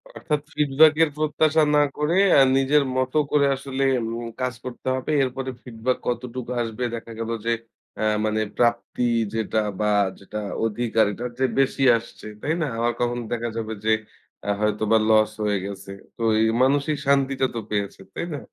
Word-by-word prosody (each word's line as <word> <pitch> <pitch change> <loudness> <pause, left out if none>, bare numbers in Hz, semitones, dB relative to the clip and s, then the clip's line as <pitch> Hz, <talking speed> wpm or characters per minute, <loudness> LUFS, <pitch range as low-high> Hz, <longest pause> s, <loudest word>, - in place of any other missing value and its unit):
অর্থাৎ 150 -2 -2
ফিডব্যাক 150 +1 +5
এর 160 - +2
প্রত্যাশা 155 +1 +2
না 145 - +5
করে 155 +5 +1 0.2
আ - - +8 0.2
নিজের 140 +2 +3
মত 130 0 0 0.2
করে 145 -1 +4
আসলে 135 0 -3 0.2
এম 115 - -3 0.3
কাজ 130 0 0
করতে 125 0 -8
হবে। 130 +3 -3
এরপরে 130 0 -3
ফিডব্যাক 125 +1 -2
কতটুকু 125 0 -3
আসবে 115 +2 -5
দেখা 115 0 -8
গেল 115 0 -3 0.2
যে 115 - +2 0.4
অ্যা 110 - 0 0.2
মানে 110 0 0 0.2
প্রাপ্তি 120 +1 +1 0.3
যেটা 110 -1 0 0.2
বা 105 0 +1 0.3
যেটা 105 +2 -6 0.3
অধিকার 115 0 +1
এটার 120 +4 -5
চেয়ে 130 0 0
বেশি 135 0 0
আসছে। 115 -1 -12 0.2
তাই 155 - 0
না? 155 - 0
আবার 120 +1 +1
কখন 120 0 0
দেখা 120 0 -2
যাবে 110 -1 -3
যে 110 - +3 0.6
আ - - 0
হয়তোবা 105 +1 +2
লস 110 -1 +4
হয়ে 105 -1 +1
গেছে। 100 0 -7 0.3
তো - - -9 0.2
এই 110 - +4 0.2
মানুষিক 145 +3 +2
শান্তিটা 135 -1 +2
তো - - -1
পেয়েছেন। 100 -2 -3
তাই - - -3
না? 145 - -4
125 Hz, 170 wpm, -23 LUFS, 110-135 Hz, 0.6 s, আ